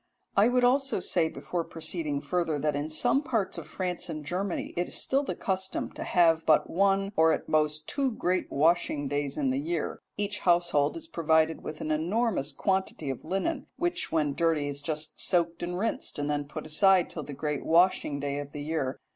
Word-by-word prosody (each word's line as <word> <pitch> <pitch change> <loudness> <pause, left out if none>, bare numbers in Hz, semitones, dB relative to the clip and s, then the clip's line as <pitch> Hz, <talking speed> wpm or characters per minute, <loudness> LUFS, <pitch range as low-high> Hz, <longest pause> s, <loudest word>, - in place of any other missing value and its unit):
I 205 +3 +6
would 250 0 +2
also 270 -1 +3
say 170 -2 +1
before 175 +1 -4
proceeding 160 -3 -2
further 170 -3 -1
that 150 0 0
in 145 +2 -2
some 155 - +2
parts 225 -9 -1
of - - -10
France 180 -2 -3
and 155 -1 -5
Germany 185 +3 -3
it 175 +1 -1
is - - -3
still 270 +1 +2
the 285 - -4
custom 190 -1 -2
to - - -6
have 165 -2 +3
but 150 -1 +4
one 195 +2 +2
or 160 0 +5
at - - -3
most 155 0 +1
two 275 -2 0
great 185 -6 -1
washing 150 -1 +2
days 145 0 -2
in 135 -3 +1
the 130 - 0
year. 165 +2 -3 0.2
Each 205 0 -2
household 175 - +2
is 325 - -8
provided 160 - +1
with 155 - -7
an 155 - -2
enormous 175 - 0
quantity 190 -4 -1
of 130 - -7
linen, 270 - -2
which 350 +1 -1
when 150 -3 +1
dirty 160 -2 +1
is 140 0 -4
just 155 +1 -3
soaked 170 -1 +1
and 175 +1 -3
rinsed, 225 +4 -2
and 145 0 -1
then 145 -1 -1
put 155 +2 -7
aside 185 +4 +4
till 155 - -5
the 145 - -8
great 150 0 -3
washing 165 -4 +3
day 140 0 -2
of 145 0 -7
the 145 - -5
year. 145 -4 -2
165 Hz, 200 wpm, -28 LUFS, 150-190 Hz, 0.2 s, I